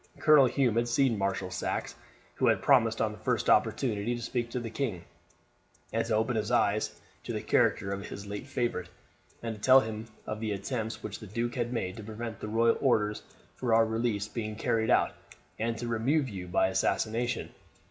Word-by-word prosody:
Colonel 150 -4 +6
Hume 125 -3 +1
had 120 0 +2
seen 120 0 +2
Marshal 95 -2 -2
Saxe, 90 - -3 0.4
who - - +1
had - - +2
promised - - +4
on - - +1
the - - -11
first - - +1
opportunity 115 -2 +2
to 120 - -6
speak 120 -2 -2
to 125 - -3
the 115 -2 -6
king, 110 -9 -3 0.9
and - - +1
to - - +1
open 110 +2 +1
his 110 0 -1
eyes 110 -3 +1 0.2
to - - -5
the - - -3
character 100 - +2
of 100 +1 -4
his 100 - -7
late 105 +5 -6
favourite, 120 -9 -2 0.5
and 115 -1 -2
to 105 - -12
tell 130 +2 +7
him 110 0 -5 0.2
of 110 - -4
the 110 -2 -2
attempts 110 +3 -4
which 105 - -5
the 110 - -9
duke 115 +4 -2
had 120 -1 -2
made 95 -5 -3
to 110 - -7
prevent 110 +1 -6
the - - -5
royal 115 +2 +2
orders 105 -6 +2 0.3
for 120 -3 +1
our 115 0 +5
release 110 -2 -1
being 110 -2 -4
carried 110 0 0
out, - - +4 0.5
and 115 0 -1
to 120 +1 -4
remove 130 +6 +1
you 95 -6 -6
by 90 +1 +2
assassination. 115 +5 -1
110 Hz, 200 wpm, -29 LUFS, 105-120 Hz, 0.9 s, tell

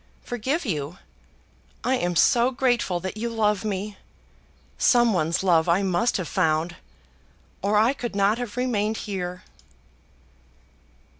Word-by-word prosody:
Forgive 260 +8 -2
you! 155 - -3 0.9
I 255 - +1
am 175 -8 0
so 235 +8 +4
grateful 245 -8 0
that 190 +3 -5
you 235 +2 -2
love 210 -3 +1
me! 205 0 -4 0.8
Some 240 -3 +4
one's 170 0 0
love 170 -3 +3
I 180 +4 +3
must 190 +5 +1
have 185 -4 -4
found, 165 -1 0 0.9
or 205 +2 +2
I 225 +5 +4
could 240 -6 -5
not 200 +3 +2
have 245 -2 -5
remained 220 -4 0
here." 180 -3 -4
205 Hz, 130 wpm, -24 LUFS, 180-235 Hz, 0.9 s, so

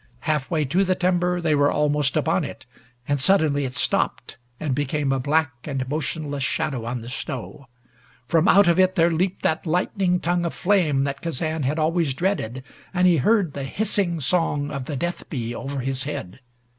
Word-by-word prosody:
Half 150 -3 -1
way 155 -3 +1
to 175 +9 +2
the 185 -1 +1
timber 180 -1 +1
they 165 -3 +1
were 145 0 +3
almost 150 -2 +1
upon - - +1
it, - - -8 0.4
and 145 -1 +1
suddenly 145 -3 +3
it 130 -1 -5
stopped - - 0 0.2
and 150 -4 -1
became 145 +1 -1
a 135 - +1
black 145 +3 +1 0.2
and 135 -3 -3
motionless 145 0 -3
shadow 130 -2 -1
on 120 0 -3
the 115 - -9
snow. 135 +3 -6 0.6
From 165 +2 +3
out 200 -1 +6
of 170 +1 +3
it 185 0 +4
there 170 -1 +4
leaped 180 +3 -1
that 160 +2 0
lightning 180 +2 +1
tongue 175 +1 0
of 170 - -3
flame 170 -8 +2
that 140 0 -3
Kazan 160 0 -2
had 140 +3 -1
always 160 -3 +1
dreaded, 135 - -2 0.3
and 180 +1 +3
he 175 -2 +5
heard 185 - +2
the 140 - -5
hissing 190 +1 0
song 145 -1 +1
of 135 -3 -4
the 145 -1 -4
death 175 +4 -4
bee 120 -5 -3
over 135 +2 -4
his 135 +1 -1
head. 115 -8 -6
150 Hz, 190 wpm, -23 LUFS, 135-175 Hz, 0.6 s, out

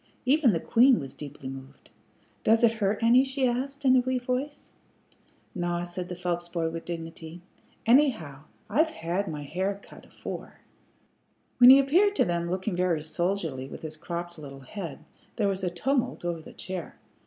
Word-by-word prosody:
Even 270 -1 +4
the 170 - 0
queen 245 +8 +5
was 135 -3 -7
deeply 145 -2 -9
moved. 135 +1 -10 0.5
"Does 225 +2 +4
it 230 - +6
hurt 205 +3 +1
any?" 240 +3 +6
she 265 0 0
asked, 275 +3 -3
in 260 -1 +6
a - - +6
wee 255 +1 0
voice. 255 +4 -4 0.8
"Naw," 175 -1 -2
said 175 +1 -6
the 180 - -4
Phelps 175 -1 -3
boy, 165 -2 -1
with 165 0 -6
dignity. 165 0 -7 0.5
"Anyhow, 220 - +2 0.2
I've 300 +10 +2
had 180 - -2
m' 160 - -4
hair 185 +7 -3
cut - - -15
afore." - - -8 1.0
When 245 0 +10
he 265 - +11
appeared 355 +10 +3
to - - +3
them 170 0 -1
looking 185 +2 -2
very 175 -4 +1
soldierly 160 -5 -2
with - - -9
his 155 -1 -5
cropped 170 +1 -6
little 135 -2 -10
head, 170 +3 -7 0.3
there 210 -4 +1
was 195 -1 -2
a 180 - +1
tumult 250 +4 -1
over 170 -2 -2
the - - -13
chair. 185 -2 -6
180 Hz, 175 wpm, -27 LUFS, 165-250 Hz, 1.0 s, he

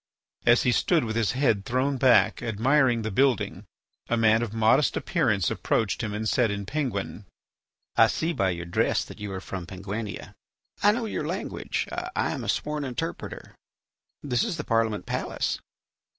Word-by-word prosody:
As 120 0 +6
he 125 - +3
stood 165 +6 +2
with 110 -1 -3
his 115 -3 +1
head 120 -7 +2
thrown 130 +5 0
back 130 -1 +4
admiring 120 +2 +2
the 110 - -2
building, 130 +2 +1 0.4
a 120 - +2
man 110 0 +4
of 120 -3 -2
modest 115 +6 +3
appearance 110 - +1
approached 110 -1 0
him 110 -3 -3
and 105 +1 -3
said 120 +1 +2
in 100 0 -3
Penguin: 105 -7 -3 0.7
"I - - +7
see 165 +2 -1
by 95 -9 +1
your 85 -1 -4
dress 85 - +1
that - - -12
you 105 -1 -5
are 95 - -4
from 95 -2 -6
Penguinia. 100 +2 -6 0.5
I 205 - +6
know 230 +2 -2
your 220 - -3
language; - - -3
I - - -2
am - - -4
a - - -4
sworn 150 0 -1
interpreter. 125 -4 -5 0.7
This 125 -4 +1
is 200 -8 -2
the 150 - -3
Parliament 115 -4 0
palace. - - -2
115 Hz, 170 wpm, -26 LUFS, 105-135 Hz, 0.7 s, I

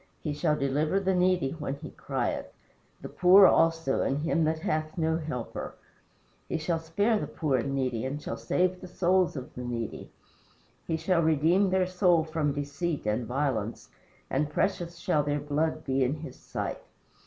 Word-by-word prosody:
He 150 - -2
shall 150 +1 +1
deliver 150 +6 +1
the 190 -1 +1
needy 180 -6 +2
when 150 -4 -4
he 150 +2 -9
crieth; 130 -4 -3 0.5
The - - -6
poor 185 +2 +7
also, 165 -5 +3
and 135 - 0
him 165 +2 +1
that 160 +1 +1
hath 155 +2 -2
no 160 -1 +1
helper. 150 -7 -5 0.7
He - - 0
shall 165 +1 -1
spare 205 +8 +1
the - - -3
poor 145 -5 0
and 135 +3 -2
needy, 130 -4 -1
and 140 +3 -3
shall - - -5
save 185 0 0
the 185 - -8
souls 180 0 +2
of 130 -3 -7
the 125 - -6
needy. 120 -3 -4 0.8
He 160 - 0
shall 170 +1 +1
redeem 160 +5 +3
their 185 0 +2
soul 180 -2 +3
from 155 -2 -1
deceit 145 +2 -3
and 110 +2 -1
violence, 125 -5 -2 0.4
And 145 +2 0
precious 175 +1 -1
shall 170 -3 +1
their 145 0 -1
blood 155 +2 -1
be 135 0 +1
in 130 +4 0
his 160 - -8
sight. - - -5
155 Hz, 175 wpm, -28 LUFS, 140-175 Hz, 0.8 s, poor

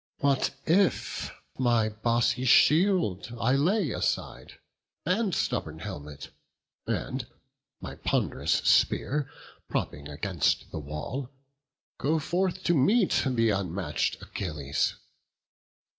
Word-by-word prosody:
What 140 -1 +1
if 185 +4 +1 0.3
my 120 -3 +3
bossy 115 +3 +1
shield 150 - +4
I 125 +3 +2
lay 165 - +2
aside, - - -2 0.5
And 190 0 +1
stubborn 80 0 -2
helmet, 75 -6 -8 0.6
and - - -2 0.5
my - - -7
pond'rous - - 0
spear 145 0 +2 0.4
Propping 70 0 -3
against 80 +3 -1
the - - -4
wall, 75 - -5 0.7
go 155 +3 +1
forth 185 +4 -1
to 175 - +3
meet 195 - +3
Th' - - +2 0.2
unmatch'd 90 -7 -1
Achilles? 75 -7 -2
120 Hz, 100 wpm, -28 LUFS, -, 0.7 s, shield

